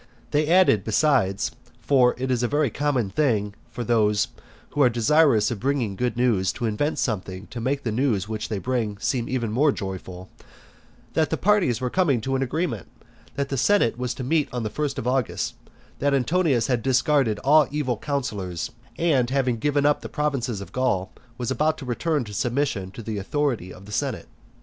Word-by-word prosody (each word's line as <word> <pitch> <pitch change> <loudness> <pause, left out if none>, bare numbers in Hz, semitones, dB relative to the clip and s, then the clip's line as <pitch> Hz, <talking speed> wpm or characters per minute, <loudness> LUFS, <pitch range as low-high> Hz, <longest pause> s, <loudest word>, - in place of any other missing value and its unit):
They 150 0 +2
added 185 +3 +5
besides, 130 - +2 0.3
(for 130 -3 +3
it 130 +1 -2
is 125 -2 +1
a 120 - +1
very 145 -1 +1
common 130 -8 0
thing 105 -6 +1 0.2
for 120 - -5
those 105 -3 +2 0.4
who 145 - 0
are 125 - +6
desirous 120 -1 +3
of 115 - -3
bringing 125 -5 0
good 120 +2 -1
news 110 -7 +2
to 120 - -4
invent 115 +8 -1
something 95 -4 -3
to 120 - -5
make 135 +4 -1
the 115 - -1
news 110 -5 0
which 110 +1 -4
they 110 - -2
bring 110 -2 -2
seem 120 +3 -1 0.3
more 140 +6 +3
joyful,) 95 -3 -6 0.9
that 160 -1 +2
parties 190 - +3
were 125 -1 -2
coming 160 -10 +2
to 135 +4 -1
an 130 - 0
agreement; 135 - -2 0.5
that 140 0 -2
the 135 - -2
senate 200 - +3
was 125 0 -3
to 130 - -5
meet 150 +3 +1
on 125 -2 -3
the 110 - -3
first 145 -2 -2
of - - -4
August; 130 -2 0 0.5
that 140 0 +2
Antonius 135 -2 +2
having 125 -3 0
discarded 130 -2 +2
all 150 +2 +5
evil 145 -4 -1
counsellors, 105 - -3 0.3
and 140 -8 +2
having 130 -3 0
given 145 +3 +1
up 145 0 +3
the - - -7
provinces 130 -8 -1
of 100 - -9
Gaul, 95 -7 0 0.3
was 125 0 -2
about 155 +5 +1
to 140 - -8
return 145 +4 0
to 105 -2 -9
submission 120 -4 -1
to 115 +4 -9
the 105 -1 -3
authority 125 - -1
of 95 - -12
the 105 - -11
senate. - - -2
125 Hz, 190 wpm, -24 LUFS, 110-145 Hz, 0.9 s, are